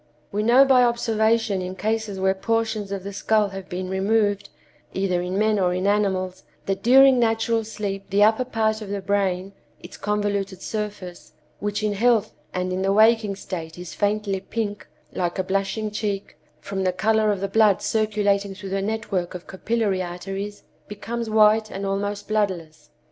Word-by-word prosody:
"We 205 - -1
know 245 +5 +6
by 260 -2 +5
observation 225 -3 +1
in 185 +1 -5
cases 215 -1 -2
where 190 0 +2
portions 220 0 -1
of 195 -2 -4
the 200 +1 -6
skull 215 +1 +1
have 195 -1 -8
been 185 +1 -4
removed, 205 +2 +1 0.5
either 185 -2 0
in 180 +2 -3
men 215 0 +2
or 180 -1 +1
in 185 +1 -2
animals, 190 -2 0 0.2
that 195 0 -2
during 265 +1 +6
natural 225 0 +1
sleep 200 -3 -5
the 205 +1 +4
upper 220 +4 +4
part 220 -2 0
of 210 - -7
the 200 0 -2
brain—its 195 -1 -3
convoluted 200 -2 -2
surface, 210 -5 -6 0.3
which 205 +1 -2
in 210 -1 +1
health 220 0 +2 0.2
and 185 0 -2
in 185 - -2
the 195 +1 +1
waking 215 -1 +4
state 170 -4 -7
is 180 -1 -8
faintly 205 -1 0
pink, 205 +1 -4 0.3
like 175 -1 -2
a 190 - 0
blushing 195 +3 -1
cheek, 205 -2 -3 0.2
from 195 -1 -4
the 185 -1 +1
color 215 +2 +2
of 200 - -2
the 195 - -1
blood 210 -1 +4
circulating 205 -2 0
through 195 0 -8
the 195 +1 -1
network 200 -4 -2
of 180 - -8
capillary 200 -1 -1
arteries—becomes 205 +5 -6
white 215 0 +4
and 195 +1 -5
almost 205 +1 -2
bloodless. 190 -7 -2
205 Hz, 165 wpm, -23 LUFS, 190-220 Hz, 0.5 s, know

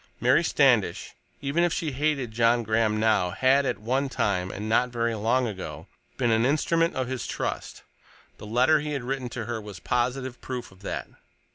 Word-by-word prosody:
Mary - - +4
Standish, - - +2 0.3
even 145 +5 +1
if 175 - +2
she 160 -1 -2
hated 140 -3 -1
John 115 +1 +3
Graham 110 0 +1
now, 110 -5 +2
had 135 +8 +3
at - - -1
one 130 +6 -1
time—and 100 -2 -1
not 120 +3 +2
very 115 -1 -1
long 115 +4 +1
ago—been 115 +3 -5
an 110 0 +3
instrument 165 +5 +2
of 130 -1 -1
his 130 -1 -4
trust; - - -4 0.6
the 105 - -9
letter 125 +8 +4
he 150 0 -4
had 135 -3 -3
written 130 0 -3
to 120 -2 -5
her 120 -1 -4
was 105 -3 -9
positive 125 +1 -1
proof 125 -5 -6
of 95 0 -19
that. 100 - -4
120 Hz, 175 wpm, -26 LUFS, 110-135 Hz, 0.6 s, Mary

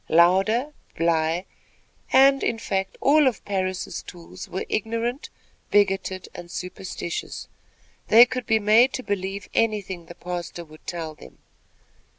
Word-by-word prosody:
Louder, 195 - +4 0.2
Bly 165 +1 +1 0.7
and, 275 +1 +6
in 230 - 0
fact, 195 -4 -3
all 290 +1 +5
of 250 - -2
Parris' 185 -2 -2
tools 180 +1 -11
were 190 - -4
ignorant, 230 +5 -2 0.4
bigoted 195 -2 +1
and 175 - -9
superstitious. 180 -1 -5 0.6
They 230 +2 +9
could 250 0 -5
be 220 - +4
made 220 +5 +5
to 255 - -4
believe 195 -1 -3
anything 200 -6 -1
the 175 - -10
pastor 175 -1 -6
would 155 0 -17
tell 165 -3 -4
them. - - -15
195 Hz, 130 wpm, -24 LUFS, 175-230 Hz, 0.7 s, They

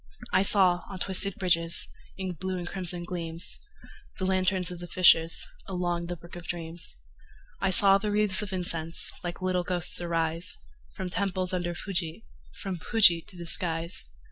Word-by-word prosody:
I 185 - +4
saw, 185 -3 +4
on 190 - -7
twisted 190 +1 +5
bridges, 170 -3 +1 0.3
In 190 -1 -4
blue 185 +3 -4
and 175 0 -6
crimson 175 -1 -3
gleams, 170 -2 -5 0.6
The 190 - -2
lanterns 185 -1 0
of 175 - -8
the 175 - -8
fishers, 165 -2 +4 0.2
Along 175 -2 -2
the 175 - -4
brook 170 +1 -13
of 175 -1 -10
dreams. 165 0 -4 0.6
I 195 - 0
saw 195 +1 +5
the 210 +1 -3
wreathes 205 -2 +5
of 205 -2 -4
incense 170 -3 -2
Like 175 +1 -6
little 185 -1 0
ghosts 175 -1 +2
arise, 165 0 -1 0.4
From 185 -1 -5
temples 185 -1 -1
under 175 -1 -2
Fuji, 170 - -4 0.3
From 185 -3 -5
Fuji 180 -5 +5
to 185 - -9
the 170 - -7
skies. 165 -1 0
180 Hz, 165 wpm, -27 LUFS, 170-190 Hz, 0.6 s, twisted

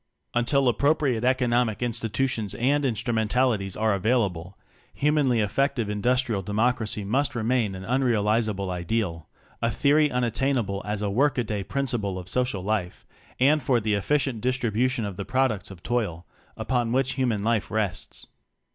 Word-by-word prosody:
Until 130 +3 +2
appropriate 135 -1 +2
economic 125 -3 +2
institu 120 +2 -1
tions 110 -6 -3
and 140 +5 +1
instrumentalities 110 -3 0
are 110 -1 +2
avail 110 +4 +2
able, 90 0 -7 0.4
humanly 140 -5 +2
effective 115 +1 0
Industrial 120 0 +1
De 95 - -7
mocracy 110 -2 0
must 135 +6 0
remain 115 -3 0
an 95 0 -8
unrealizable 110 -5 +1
ideal, 85 -2 -2 0.3
a 115 - +2
theory 150 +5 +3
unattainable 125 -4 0
as 105 0 -3
a 100 - -1
work 135 +7 +2
a 120 - +2
day 105 -3 -3
principle 115 -6 -2
of 90 -1 -7
social 125 -4 0
life, 100 -3 -2 0.3
and 145 +4 +4
for 125 -2 +2
the 110 -1 -1
efficient 125 +3 0
distribution 125 -1 0
of 100 -3 -6
the - - -3
pro 130 0 +2
ducts 105 -5 -5
of 95 -3 -12
toil, 105 -9 -2 0.3
upon 120 -3 -1
which 130 +1 +1
human 120 -6 0
life 110 -2 0
rests. 105 -4 -3
115 Hz, 155 wpm, -25 LUFS, 105-130 Hz, 0.4 s, and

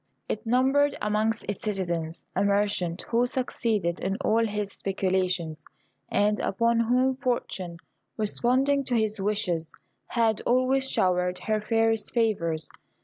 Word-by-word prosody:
It 215 - -4
numbered 270 +4 +3
amongst 215 +2 0
its 205 - -4
citizens 175 -6 -3
a - - +2
merchant, 200 -4 0
who 240 +1 +2
succeeded 225 -8 -1
in 195 - -1
all 230 -3 +3
his 210 -2 -2
speculations, 185 -4 -1 0.5
and 210 +1 +2
upon 230 +3 +1
whom 255 +3 +2
Fortune, 195 -9 -2 0.4
responding 255 +6 +2
to 250 - 0
his 215 -2 0
wishes, 185 -5 0 0.4
had 225 -3 +1
always 260 +2 +2
showered 180 0 +1
her 215 -1 0
fairest 225 +1 +1
favours. 170 -9 +1
215 Hz, 125 wpm, -27 LUFS, 185-240 Hz, 0.5 s, numbered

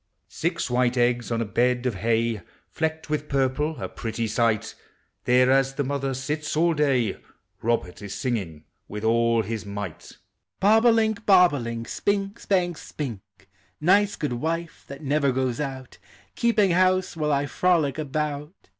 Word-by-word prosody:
Six 170 +1 -2
white 125 0 +1
eggs 120 0 +1
on 115 0 0
a - - -1
bed 125 +4 +1
of 125 - +1
hay, 115 +1 0 0.3
Flecked 160 0 -2
with 150 0 -2
purple, 140 +3 0
a - - -3
pretty 115 0 -4
sight! 110 0 0 0.5
There 125 +1 +4
as 135 0 +2
the 145 - 0
mother 135 -1 -2
sits 150 +3 -3
all 170 +1 +3
day, 135 -8 +1 0.4
Robert 115 -6 -1
is 100 -1 -6
singing 100 - -3 0.2
with 105 +1 -6
all 115 0 +3
his 110 +1 -4
might: 100 -5 -7 0.4
Bob 220 +4 +5
o' - - +8
link, 220 -1 +2
bob 180 -4 +6
o' 145 - -1
link. 115 -1 -5
Spink', 200 +5 -1
spank, 175 -4 0
spink; 105 -8 -8 0.3
Nice 200 +5 +3
good 150 -5 -2
wife, 165 +6 -3
lliat 140 +1 -8
never 140 -1 +1
goes 130 -2 -1
out. 135 -3 -6 0.3
Keeping 215 -5 +2
house 185 +1 +2
while 155 -2 -1
1 140 -1 +1
frolic 160 -3 +1
about. 150 - -4
135 Hz, 160 wpm, -25 LUFS, 115-160 Hz, 0.5 s, o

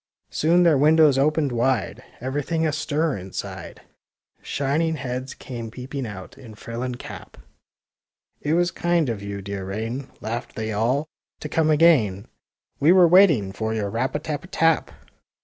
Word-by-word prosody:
Soon 170 +3 +3
their 160 -5 +4
windows 150 -2 +5
opened 150 0 +2
wide,— 120 -2 0 0.2
Everything 145 +6 -2
astir 150 0 0
inside; 95 0 -7 0.6
Shining 155 +4 -1
heads 130 -1 -5
came 120 -3 -7
peeping 130 +2 -6
out, 100 +5 -10
in 115 -5 -12
frill 115 +2 -7
and 125 -1 -3
cap; - - -10
*^ - - -17 1.0
It 150 +2 0
was 175 0 +2
kind 170 -4 +1
of 110 -4 -3
you, 100 -1 -6
dear 100 0 -5
rain," 115 +7 -4
Laughed 115 +2 -5
they 110 0 -3
all, 120 +7 +1
^' - - -20 0.4
to - - -4
come 155 +1 +1
again. 140 - +4 0.5
We 150 +4 +5
were 180 -1 +7
waiting 165 - +5
for 110 +2 -3
your 100 -2 -2
rap 125 +5 -1
a - - 0
tap 150 -1 -4
a - - -11
tap! 165 -3 +2
135 Hz, 165 wpm, -23 LUFS, 110-155 Hz, 1.0 s, were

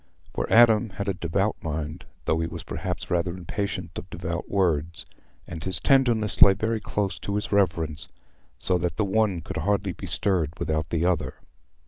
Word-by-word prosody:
For - - -3
Adam 115 -1 +6
had 100 +1 -5
a 100 - +1
devout 95 +4 -1
mind, 80 +1 -4 0.2
though 80 - +1
he 80 - -1
was 85 - -7
perhaps - - -5
rather 85 0 0
impatient 100 +3 -4
of - - -12
devout - - -4
words, 85 -4 0 0.4
and 80 -2 -7
his 95 -1 -1
tenderness 120 -6 +3
lay 100 - +10
very 110 +3 -1
close 105 -2 -2
to 100 - -3
his 105 - -2
reverence, 85 -5 +1 0.5
so 90 +6 0
that 85 -1 -2
the 110 - +2
one 100 -3 +1
could 95 +4 -6
hardly 100 0 0
be 95 - -8
stirred 85 -3 0
without 80 +1 -1
the 85 0 0
other. 90 -2 0
95 Hz, 175 wpm, -26 LUFS, 80-100 Hz, 0.5 s, lay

